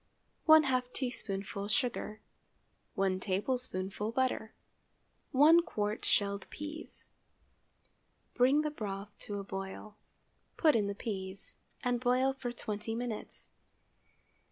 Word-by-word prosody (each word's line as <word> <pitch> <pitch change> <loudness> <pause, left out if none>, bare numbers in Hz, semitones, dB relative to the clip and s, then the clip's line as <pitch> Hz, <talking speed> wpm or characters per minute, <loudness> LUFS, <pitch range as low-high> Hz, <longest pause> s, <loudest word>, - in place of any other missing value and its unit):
½ 265 -6 +6
teaspoonful 200 -6 -3
sugar. 220 -2 -1 0.7
1 190 -1 +1
tablespoonful 200 0 -1
butter. 250 -3 0 0.8
1 310 +6 +7
qt. 210 -7 -2
shelled 200 -1 +1
peas. 300 +2 -7 1.3
Bring 265 +4 +5
the 305 0 -1
broth 205 -5 -5
to 205 - -5
a 200 - -4
boil; 195 +2 -6 0.6
put 310 -5 +5
in 210 -3 +2
the 200 - -3
peas, 195 -3 -4 0.3
and 245 -1 +1
boil 255 +2 +3
for 255 -2 -4
twenty 220 -1 -4
minutes. 235 -2 -5
220 Hz, 105 wpm, -33 LUFS, 200-255 Hz, 1.3 s, 1